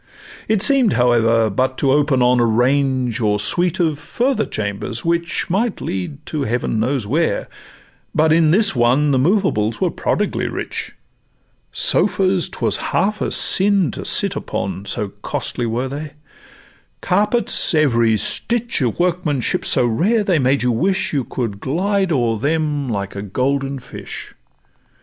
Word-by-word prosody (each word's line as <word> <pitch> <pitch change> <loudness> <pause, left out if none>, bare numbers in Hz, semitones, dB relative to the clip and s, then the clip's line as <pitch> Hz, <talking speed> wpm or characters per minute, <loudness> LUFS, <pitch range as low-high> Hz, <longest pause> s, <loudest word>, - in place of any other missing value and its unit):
It 215 -2 +1
seem'd, 270 -6 +3
however, 115 -2 +2
but 130 +5 -1
to 135 - +1
open 140 -2 +2
on 125 0 +3
A - - +3
range 125 +1 +1
or 105 -2 +1
suite 175 - 0
of 160 -4 0
further 260 - -1
chambers, 110 +4 -4
which 170 -1 -1
Might 205 +5 -1
lead 95 +11 -5
to 155 - -4
heaven 120 -3 -1
knows 125 0 -1
where; 155 +10 0 0.7
but 155 0 +3
in 160 -1 +4
this 200 +2 +4
one 125 +5 +2
The 130 - +2
movables 130 - +1
were - - 0
prodigally - - -1
rich: - - -5 0.8
Sofas 190 -2 +2
'twas - - -1
half 205 +3 -1
a - - 0
sin 195 - +3
to - - -7
sit - - +1
upon, 95 +1 -4
So 105 - -2
costly 120 - -3
were 120 +4 -2
they; 145 +2 -7 0.9
carpets 210 +6 +1
every 115 -7 +3
stitch 235 - 0
Of 120 -4 -1
workmanship 175 -7 -1
so 125 - +2
rare, 195 - +1
they 185 -5 +1
made 135 +1 +1
you 125 - +2
wish 190 +12 0
You 135 -4 -1
could 115 -6 -4
glide 190 - -1
o'er 120 -6 0
them 150 -1 -1
like 100 -3 -4
a 100 - -4
golden 135 +6 -2
fish. 125 - -9
140 Hz, 150 wpm, -19 LUFS, 120-175 Hz, 0.9 s, in